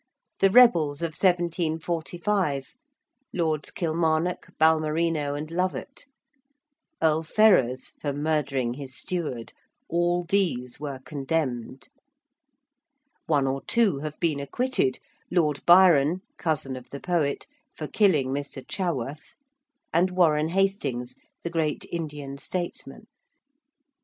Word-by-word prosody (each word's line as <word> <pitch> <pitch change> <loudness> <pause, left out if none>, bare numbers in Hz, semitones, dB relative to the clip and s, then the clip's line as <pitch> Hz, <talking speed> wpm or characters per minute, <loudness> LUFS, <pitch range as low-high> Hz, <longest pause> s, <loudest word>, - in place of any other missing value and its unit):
the 195 - +5
rebels 170 - +5
of 165 - 0
1745, 170 -2 -1 0.6
Lords 160 -4 -1
Kilmarnock, 165 +1 0
Balmerino 155 -1 +2
and 155 +2 -6
Lovat: 185 +9 -3 1.0
Earl 160 0 +3
Ferrers, 160 - +3
for 145 - -1
murdering 140 -4 -1
his 130 -1 -7
steward; 150 -11 -3 0.3
all 175 +1 +1
these 165 -10 -1
were 140 -3 -5
condemned. 135 -4 -3 1.4
One 145 -4 +2
or 135 0 -1
two 215 -11 +3
have 150 +1 -6
been 155 -4 0
acquitted, 140 - 0 0.3
Lord 155 -5 +1
Byron 175 -2 +6 0.2
cousin 150 -5 -1
of 125 -1 -10
the 140 - -7
poet 165 -5 -1 0.3
for 155 - -5
killing 160 -11 +2
Mr. 140 0 -4
Chaworth: 150 - -3 0.6
and 175 +3 +3
Warren 160 -4 +3
Hastings, 145 - -1 0.3
the 170 - -4
great 160 -3 -1
Indian 145 -4 -5
statesman. 175 +2 -5
155 Hz, 105 wpm, -26 LUFS, 140-175 Hz, 1.4 s, Byron